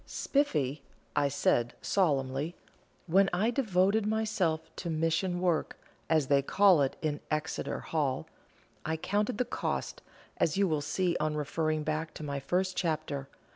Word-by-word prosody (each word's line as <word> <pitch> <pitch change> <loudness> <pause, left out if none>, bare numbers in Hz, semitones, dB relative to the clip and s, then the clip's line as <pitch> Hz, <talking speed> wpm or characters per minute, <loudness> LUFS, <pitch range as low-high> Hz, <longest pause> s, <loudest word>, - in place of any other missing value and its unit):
"Spiffy," 150 - 0 0.5
said 120 -4 +1
I, - - -32
solemnly, 145 -3 +1 0.5
"when 195 +3 +4
I 205 +7 +2
devoted 205 -3 +2
myself 185 -8 0
to 175 - -4
'mission 165 +3 0
work,' 175 -3 0 0.3
as 155 -3 +3
they 140 +1 +4
call 190 +2 +5
it 135 - +1
in 150 -2 -1
Exeter 155 +2 -2
Hall, 145 -5 -1 0.6
I 160 +1 -1
counted 205 +7 -1
the 250 - +1
cost, - - -3 0.4
as 165 +2 +1
you 200 -1 +3
will 155 -3 0
see 175 +3 0
on 155 0 0
referring 155 +1 -1
back 155 +1 -2
to - - -7
my 140 -1 -3
first 185 +7 0
chapter. 155 -5 -2
160 Hz, 145 wpm, -30 LUFS, 150-190 Hz, 0.6 s, call